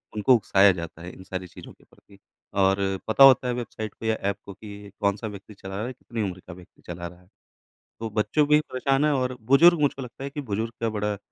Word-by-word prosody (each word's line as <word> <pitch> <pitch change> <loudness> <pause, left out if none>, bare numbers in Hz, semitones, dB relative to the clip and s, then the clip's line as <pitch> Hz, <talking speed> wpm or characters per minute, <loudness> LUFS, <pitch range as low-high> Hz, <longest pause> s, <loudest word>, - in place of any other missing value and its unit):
उनको 115 +5 +4
उकसाया 100 -3 +4
जाता 85 -2 -7
है 90 - -8
इन 95 - -13
सारी 95 0 -6
चीज़ों - - -13
के - - -26
प्रति 100 - -22 0.4
और 95 0 +3 0.3
पता 110 +5 +5
होता 130 -2 +7
है 125 - 0
वेबसाइट 110 -3 -6
को - - -10
या 110 0 +2
ऐप 100 -1 -2
को 100 - -9
कि 105 - -13
ये 100 0 -10
कौन-सा 100 +2 0
व्यक्ति 105 0 -10
चला 95 -1 -9
रहा 110 +4 -3
है, 130 - -6
कितनी 115 -2 -6
उम्र 95 -2 -4
का 90 - -8
व्यक्ति 90 0 -17
चला 85 0 -6
रहा 90 +1 -14
है। 90 - -25 0.7
तो 115 -1 -4
बच्चों 115 +8 +1
भी 150 0 +5
परेशान 135 0 0
है 150 - +3
और 130 -2 -1
बुज़ुर्ग 170 +4 +7
मुझको 140 -2 0
लगता 125 +2 -9
है 140 - -4
कि 145 +1 -5
बुज़ुर्ग 115 -2 -3
का 115 - 0
बड़ा 105 0 -1
अ, - - -10
110 Hz, 250 wpm, -25 LUFS, 95-130 Hz, 0.7 s, होता